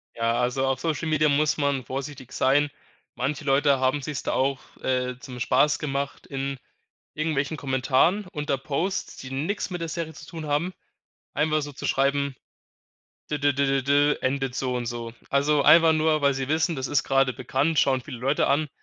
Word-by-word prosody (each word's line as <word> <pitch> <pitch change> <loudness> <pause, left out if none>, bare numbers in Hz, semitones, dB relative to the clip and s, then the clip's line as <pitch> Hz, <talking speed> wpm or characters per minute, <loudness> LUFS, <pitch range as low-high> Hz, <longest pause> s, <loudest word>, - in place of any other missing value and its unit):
Ja, 115 0 0
also, 125 +2 0
auf 135 -1 0
Social-Media 155 -1 +1
muss 150 +2 +2
man 140 -3 0
vorsichtig 135 -1 -6
sein. 145 +3 +3 0.5
Manche 145 +4 -2
Leute 140 0 +3
haben 130 +2 +1
sich's 145 0 -4
da - - -1
auch, 135 0 +1 0.2
äh, 125 -1 -1
zum 125 -2 -9
Spaß 145 +4 +3
gemacht 140 -1 -3
in 135 -1 -3 0.6
irgendwelchen 155 -1 -1
Kommentaren 135 +8 +1
unter 145 -4 -1
Posts, 175 +9 -2
die 130 - -9
nix 160 +10 -2
mit 180 - -4
der 165 - -3
Serie 160 0 -4
zu 155 0 -12
tun 160 -2 -7
haben, 150 +6 0 0.6
einfach 155 +1 +1
so 145 0 -5
zu - - -7
schreiben: 140 0 +1 1.0
„D 150 - -1
d 145 0 +3
d 140 +1 +1
d 135 0 +1
d 145 +2 +3
endet 135 -1 -1
so 130 -1 -1
und 120 -1 -2
so.“ 115 -1 -5 0.2
Also, 140 +1 +3
einfach 165 -1 +7
nur, 155 -1 +2
weil 140 -1 +4
sie 135 0 -3
wissen, 160 +1 +1
das 130 0 -2
ist 145 - +1
grade 135 -1 +2
bekannt, 135 +6 0
schauen 130 -2 +3
viele 125 0 -8
Leute 135 +4 +1
an, 150 +2 +2
140 Hz, 185 wpm, -25 LUFS, 130-150 Hz, 1.0 s, einfach